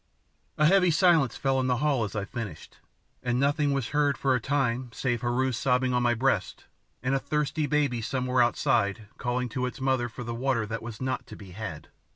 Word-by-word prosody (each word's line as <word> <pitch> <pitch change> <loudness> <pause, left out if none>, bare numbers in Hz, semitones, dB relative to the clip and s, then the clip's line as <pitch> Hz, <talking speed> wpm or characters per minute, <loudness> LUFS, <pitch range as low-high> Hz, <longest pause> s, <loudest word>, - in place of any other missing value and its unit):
A 150 - +4
heavy 180 +2 +5
silence 160 - +3
fell 135 -1 +1
on 130 - 0
the 125 -1 +2
hall 140 -3 +1
as 110 - -5
I 100 -1 -2
finished, 105 - -7 0.4
and 125 0 0
nothing 145 +1 +2
was 135 -4 -1
heard 145 -1 +1
for 135 -1 +2
a 125 - +2
time 130 -2 0
save 120 -1 -1
Heru 125 +2 +1
sobbing 125 +1 +1
on 125 - +2
my 120 -1 +2
breast 130 +4 0 0.4
and 130 +2 +1
a 135 - +2
thirsty 150 +2 -1
baby 140 -5 +1
somewhere 125 +2 0
outside 120 -4 +1
calling 125 0 -1
to 125 +2 -2
its 125 - -7
mother 130 -2 +1
for 120 +2 -8
the 120 0 -4
water 120 -1 0
that 115 +2 -4
was 115 0 -8
not 130 0 -2
to - - -9
be 95 -3 -12
had. 95 -5 -7
125 Hz, 205 wpm, -27 LUFS, 120-140 Hz, 0.4 s, heavy